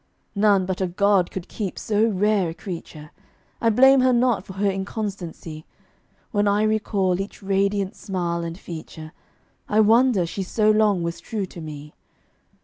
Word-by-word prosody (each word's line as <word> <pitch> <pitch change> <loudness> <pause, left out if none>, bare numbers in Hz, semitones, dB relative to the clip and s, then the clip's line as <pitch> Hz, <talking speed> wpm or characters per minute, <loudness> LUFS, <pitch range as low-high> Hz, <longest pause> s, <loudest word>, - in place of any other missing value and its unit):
None 200 -2 +3
but 185 0 -3
a 190 - +1
god 195 0 +2
could 190 -1 -7
keep 200 -5 -5
so 215 +1 +1
rare 205 -3 +1
a - - -5
creature: 165 -4 -8 0.5
I 230 - +3
blame 265 +4 +6
her 255 0 +4
not 240 -4 +2
for 190 - -10
her 200 +2 0
inconstancy; 190 -5 -5 0.7
When 205 -3 +1
I 205 +1 +2
recall 200 -4 0
each 200 +1 -8
radiant 195 +1 0
smile 175 -4 -3
and 165 0 -5
feature, 160 -3 -9 0.6
I 210 - +2
wonder 225 -3 +4
she 180 +4 -5
so 215 +3 +2
long 210 -4 +2
was 170 0 -4
true 210 -3 -4
to 175 -2 -11
me. 150 -1 -9
195 Hz, 160 wpm, -23 LUFS, 175-215 Hz, 0.7 s, blame